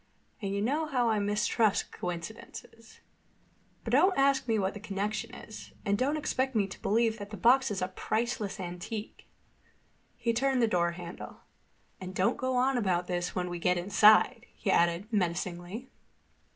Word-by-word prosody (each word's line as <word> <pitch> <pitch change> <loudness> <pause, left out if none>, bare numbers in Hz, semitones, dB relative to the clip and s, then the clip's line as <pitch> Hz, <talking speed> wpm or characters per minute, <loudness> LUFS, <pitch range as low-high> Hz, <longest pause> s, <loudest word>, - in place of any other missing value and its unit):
And 195 -2 -2
you 200 +1 -1
know 300 +7 0
how 250 -5 +1
I 215 - +1
mistrust 210 +1 +1
coincidences. 220 +5 -8 0.8
But 230 - -4
don't 365 +9 +4
ask 275 -1 +3
me 225 -1 +2
what 195 -1 0
the 205 - -8
connection 205 +1 -3
is. 220 - -11
And 200 - +2
don't 275 +8 0
expect 265 -3 -1
me 210 -2 +3
to - - -10
believe 225 +1 +1
that 205 0 -7
the 210 - -7
box 255 +6 +4
is 195 -3 -2
a - - 0
priceless 215 +2 -2
antique." 180 +4 -6 0.9
He 235 - 0
turned 265 +2 +1
the 230 - +4
door 170 -4 +1
handle. 175 0 -9 0.6
"And 185 0 -7
don't 185 - +2
go 255 0 -1
on 255 +1 +2
about 180 -5 0
this 175 -1 -3
when 180 -1 -1
we 175 -1 -5
get 180 +1 +2
inside," 205 +4 +4
he - - -1
added 170 +3 +2
menacingly. 180 +4 -2
210 Hz, 165 wpm, -30 LUFS, 185-240 Hz, 0.9 s, don't